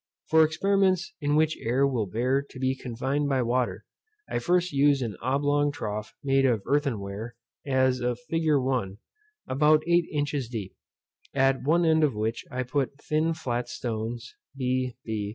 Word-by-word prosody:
For 160 0 +7
experiments 190 +3 +1
in 145 0 +1
which 155 0 +3
air 130 +4 +2
will 125 -7 0
bear 125 +8 +1
to 140 -2 -13
be 130 0 +1
confined 135 +3 -2
by 130 -2 +2
water, 120 +1 -1 0.4
I - - -1
first 180 0 +1
used 140 -1 +3
an 110 -4 -4
oblong 145 +3 +1
trough 105 -5 -5
made 135 -1 +3
of 120 -6 +2
earthen 140 -6 +1
ware, 100 +4 -6 0.3
as 130 -1 +2
a 125 0 0
fig. 125 +7 -3
1. 130 -9 +1 0.5
about 150 +3 +4
eight 170 0 +3
inches 145 -4 -2
deep, 105 -6 -6 0.6
at 135 -1 +3
one 165 +5 +2
end 160 -1 +4
of 140 -7 +2
which 110 +2 -2
I 125 0 -2
put 140 +2 -2
thin 155 +2 0
flat 120 -5 -3
stones, 115 0 -4 0.3
_b. 130 -1 0
b. 105 -2 -3
135 Hz, 165 wpm, -27 LUFS, 120-145 Hz, 0.6 s, For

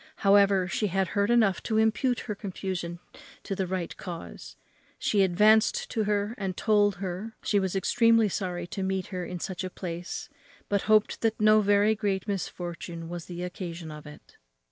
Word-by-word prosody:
However, 195 -2 +5
she 210 +3 -1
had 190 -1 0
heard 200 +2 +1
enough 225 -5 +3
to 220 - -1
impute 220 +3 +2
her 215 - -4
confusion 190 -4 -5 0.5
to - - -4
the 190 -1 -2
right 180 -2 -3
cause; 85 - -8 0.4
she 205 - +1
advanced 215 - +3
to 220 -3 0
her, 205 +1 0
and 190 -2 -3
told 205 -2 +3
her, 195 +4 -5
she 205 - +2
was 190 -1 -2
extremely 230 +3 +4
sorry 180 -3 -3
to 185 +3 -6
meet 190 0 -1
her 180 -1 -2
in 180 0 -5
such 185 +2 -4
a 185 - -3
place, 175 -1 -6 0.4
but 200 -1 +1
hoped 215 -1 +3
that 225 -1 0
no 215 0 +6
very 205 +1 +4
great 200 -2 -2
misfortune 175 -3 -5
was 175 -1 -6
the 175 0 -6
occasion 175 -3 -6
of 150 0 -10
it. 150 - -14
195 Hz, 175 wpm, -27 LUFS, 180-210 Hz, 0.5 s, no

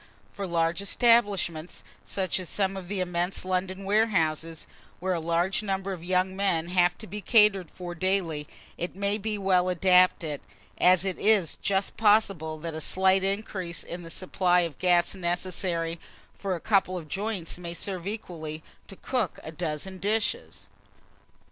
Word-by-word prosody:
For 200 -1 -4
large 170 +1 0
establishments, 200 -7 +2 0.2
such 190 -1 -1
as 185 - -7
some 195 -1 0
of 190 -2 -7
the 195 0 -2
immense 180 +1 -1
London 185 +1 -2
warehouses, 165 -6 0 0.3
where 185 +1 -1
a 170 - -1
large 170 +4 +1
number 195 -1 -2
of 170 -3 -8
young 185 +1 +1
men 175 -4 0
have 175 -1 +3
to 220 - -8
be 210 +1 -7
catered 205 -4 +4
for 175 -1 -7
daily, 175 -4 0 0.3
it 175 - -4
may 200 +2 0
be 215 +1 -2
well 185 -2 +2
adapted, 180 -4 +3 0.4
as 185 +1 +5
it 190 -2 -2
is 205 -6 +3
just 195 0 -1
possible 195 -7 +2
that 165 0 -4
a 160 - -4
slight 190 +3 +3
increase 195 -3 -2
in 175 +1 -7
the 165 - -10
supply 180 +1 +2
of 165 -5 -4
gas 175 -1 +3
necessary 175 -2 -2 0.3
for 195 -2 -3
a - - -5
couple 190 -1 +1
of 165 -3 -7
joints, 195 -1 -3
may 170 -1 -5
serve 185 -1 -3
equally 160 -7 -6 0.2
to 195 - -10
cook 245 -2 -2
a 155 - -7
dozen 170 +3 -4
dishes. 220 - -1
185 Hz, 160 wpm, -27 LUFS, 170-195 Hz, 0.4 s, as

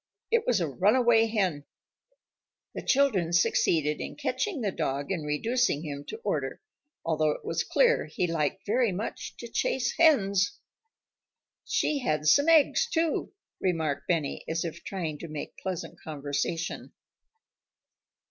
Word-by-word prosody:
It 465 -1 +2
was 240 -5 +3
a 170 - +1
runaway 225 - +4
hen. 190 -10 0 1.1
The - - -5
children 230 -12 +2
succeeded 155 -3 +2
in - - -6
catching 390 - -2
the 205 -3 0
dog 140 -2 -2
and 175 -5 -2
reducing 160 - 0
him 145 -2 -6
to - - -6
order, - - -2 0.5
although 155 -1 +2
it - - -11
was - - -1
clear - - +3
he - - -1
liked 165 +1 -1
very 230 +1 +2
much 200 +5 -5
to 235 - -7
chase 240 +1 0
hens. 205 - +4 1.1
"She 295 - 0
had 155 - -1
some 285 - +5
eggs, 330 - +4
too," 330 -6 0 0.3
remarked 160 -6 -1
Benny 160 -5 -1
as 165 +1 -1
if 165 - -6
trying 165 -6 -4
to 170 - -7
make 155 -2 -7
pleasant 185 -3 -5
conversation. 150 +3 -3
185 Hz, 140 wpm, -28 LUFS, 155-245 Hz, 1.1 s, some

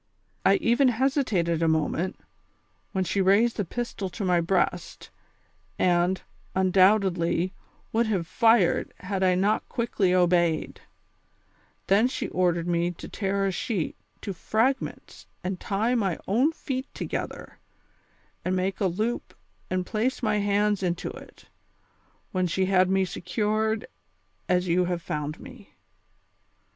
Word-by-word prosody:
I - - +5
even 260 -5 +3
hesitated 225 - +1
a 165 - +3
moment, 160 +3 0 0.8
wlien 190 -1 +1
she 195 - 0
raised 205 +5 +3
the 205 - +1
pistol 205 -1 -4
to 195 +2 -5
my 180 -2 +3
breast, 180 +3 -1 0.7
and, 180 +1 +2 0.4
luidoubtedly, 185 -2 +3 0.4
would 230 +1 +2
have 190 -6 0
fired 225 -1 +3
had 190 0 -3
I 185 -1 +4
not 200 +4 +1
quickly 220 -6 0
obeyed; 175 -3 +2 1.0
then 205 +5 +4
she 255 - -4
ordered 175 -2 +1
me 170 0 +1
to 175 - -8
tear 195 -1 -1
a 195 - +1
sheet 185 -2 -2 0.3
to 200 - -4
fragments 225 +9 -2 0.2
and 185 0 -3
tie 215 +5 0
my 195 -8 0
own 250 +11 +3
feet 265 -4 -5
together, - - -5 0.8
and 185 +1 0
make 185 +1 -1
a 195 - +2
loop 215 +7 -3 0.3
and 185 0 -1
]ilace 235 +6 -1
my 210 -2 +2
hands 205 0 +1
■into 175 -2 -2
it, - - -14 0.9
when 185 -1 0
she 190 +3 0
had 185 -1 +3
me 190 0 +2
secured 215 +5 -1 0.6
as 180 0 +2
you 180 +1 +2
have 175 -1 -2
found 150 0 -4
me." 255 -6 -13
190 Hz, 130 wpm, -26 LUFS, 180-220 Hz, 1.0 s, I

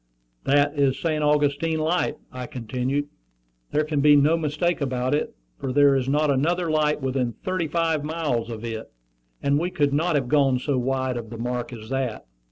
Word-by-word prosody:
"That 145 +1 +3
is 135 -2 +3
St. 155 -1 -1
Augustine 150 +2 +2
Light," 160 +3 0
I 125 -1 -6
continued. 130 +4 -2 0.7
"There 150 - +2
can 150 -2 -1
be 145 0 +7
no 145 +3 +4
mistake 165 +2 -1
about 130 -1 -1
it, 150 - -1 0.2
for 135 - -3
there 140 +1 +5
is 130 -1 0
not 150 +1 +2
another 165 +5 +1
light 150 -1 +1
within 130 -2 -1
thirty 185 -3 -1
five 165 -2 0
miles 150 -7 -2
of 115 0 -6
it; 110 - -6 0.5
and 140 +1 +2
we 175 +3 -1
could 145 -5 +1
not 160 +3 +1
have 135 -4 +1
gone 135 -1 +3
so 130 +1 -1
wide 130 0 -1
of 115 -2 -6
the 115 - -7
mark 120 +1 -3
as 110 -2 -9
that." 130 -4 -2
145 Hz, 185 wpm, -24 LUFS, 130-155 Hz, 0.7 s, be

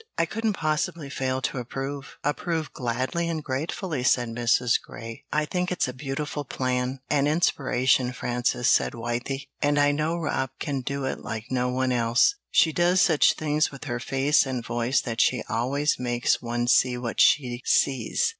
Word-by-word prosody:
"I 165 - +3
couldn't 220 +4 -1
possibly 155 -3 -2
fail 130 -1 -2
to 130 - -1
approve, 135 +3 -6
approve 160 +2 -2
gladly 130 +8 -2
and 160 -2 -3
gratefully," 150 +2 -3
said 125 -1 +2
Mrs. 120 +1 +2
Grey. 115 -1 -10
"I 150 0 +1
think 180 +3 -2
it's 180 - 0
a 125 - -5
beautiful 145 +2 -4
plan 130 0 -2
an 145 -1 +3
inspiration, 130 -5 +2
Frances," 125 0 -1
said - - +3
Wythie. 120 +4 -3 0.2
"And 145 0 +2
I 145 0 +4
know 155 +3 -1
Rob 145 -5 -1
can 140 -3 -2
do 140 +1 -3
it - - -3
like 110 +2 -6
no 125 -1 +1
one 130 0 0
else; 120 - +3 0.2
she 160 - +4
does 175 +3 +3
such 165 -4 +5
things 155 0 +1
with 135 - -10
her 120 -4 -3
face 135 +3 +2
and 125 -3 -3
voice 120 +3 0
that 115 -3 -1
she - - +2
always 140 +6 0
makes 120 -1 0
one 120 0 -2
see 125 0 +4
what 120 -2 -1
she 125 -3 +3
sees." 135 - +2
130 Hz, 175 wpm, -25 LUFS, 125-150 Hz, 0.2 s, such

